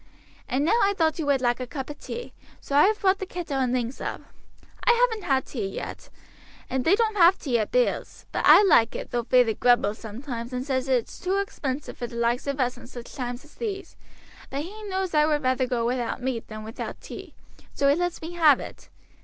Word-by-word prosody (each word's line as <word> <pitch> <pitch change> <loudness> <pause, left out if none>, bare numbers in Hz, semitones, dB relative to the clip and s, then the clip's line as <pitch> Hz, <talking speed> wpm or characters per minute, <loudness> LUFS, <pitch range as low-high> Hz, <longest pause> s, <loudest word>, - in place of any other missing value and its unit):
And 275 +3 +1
now 450 +8 +3
I 400 0 +3
thought 320 -1 +1
you 305 - -2
would 275 -2 +2
like 240 0 +1
a 255 - -4
cup 265 +1 -5
of 295 - -11
tea, 480 - -7 0.3
so 280 - -4
I 290 - +7
have 430 0 0
brought 385 0 +3
the 385 - -3
kettle 335 -7 -4
and 255 -2 +1
things 245 0 -2
up. - - -4 0.6
I 475 - +5
haven't 470 -3 +1
had 265 -2 +2
tea 220 -7 -4
yet, 195 - -7 0.6
and 260 0 0
they 345 +8 +5
don't 440 -1 0
have 355 +1 +6
tea 245 -5 0
at 215 - -1
Bill's; - - 0
but - - -1
I - - +8
like 230 - +4
it, - - -6
though 240 -1 -1
feyther 250 -3 +4
grumbles 240 -2 +2
sometimes, 235 +2 -6
and 250 +1 -3
says 265 -2 -1
it's 255 -4 0
too 375 +2 0
expensive 295 -9 -4
for 240 - -3
the 235 - -11
likes 235 +3 0
of 280 0 -2
us 250 -1 0
in - - -12
sich 240 -2 -10
times 245 0 -5
as 300 - -19
these; 395 -5 -5 0.5
but 280 +2 -3
he 415 +6 -9
knows 380 -2 -2
I 300 0 +4
would 300 -2 +1
rather 255 0 +1
go 240 -2 -1
without 245 0 -1
meat 250 -3 -3
than 215 0 -8
without 220 +1 -6
tea, - - -10 0.4
so 280 - +2
he 280 - +6
lets 355 0 -2
me 325 - -5
have 315 -6 +5
it. - - -10
270 Hz, 230 wpm, -25 LUFS, 245-350 Hz, 0.6 s, I